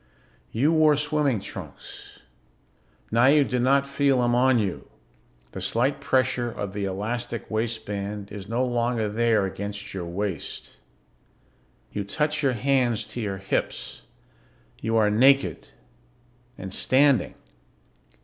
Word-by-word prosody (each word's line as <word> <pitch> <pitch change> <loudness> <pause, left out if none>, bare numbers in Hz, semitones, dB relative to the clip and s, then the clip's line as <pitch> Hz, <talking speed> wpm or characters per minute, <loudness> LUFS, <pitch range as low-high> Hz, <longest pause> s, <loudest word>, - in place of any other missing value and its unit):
You 140 +8 +2
wore 155 -2 +5
swimming 150 -5 0
trunks. - - -10 0.9
Now 120 +3 +4
you 145 +1 +6
do 125 -2 -1
not 135 +3 +3
feel 140 -2 +2
them 120 0 +2
on 130 +1 +4
you; 100 -5 -2 0.6
the 95 - -7
slight 125 +9 0
pressure 130 -3 +1
of 100 -4 -5
the 100 -1 -2
elastic 115 +5 -4
waistband 105 -2 -3
is 100 -1 -8
no 120 +3 +1
longer 120 -2 0
there 110 -1 +2
against 100 +2 -6
your 95 -3 -4
waist. 95 -1 -5 1.1
You 100 - -3
touch 150 +8 -1
your 135 -3 +2
hands 125 -2 +1
to 120 - -5
your 100 -3 -3
hips. 95 0 -3 0.8
You 115 +1 0
are 105 -1 +3
naked. 130 - +3 0.9
And 95 0 -6
standing. 135 -3 +3
120 Hz, 125 wpm, -25 LUFS, 105-135 Hz, 1.1 s, you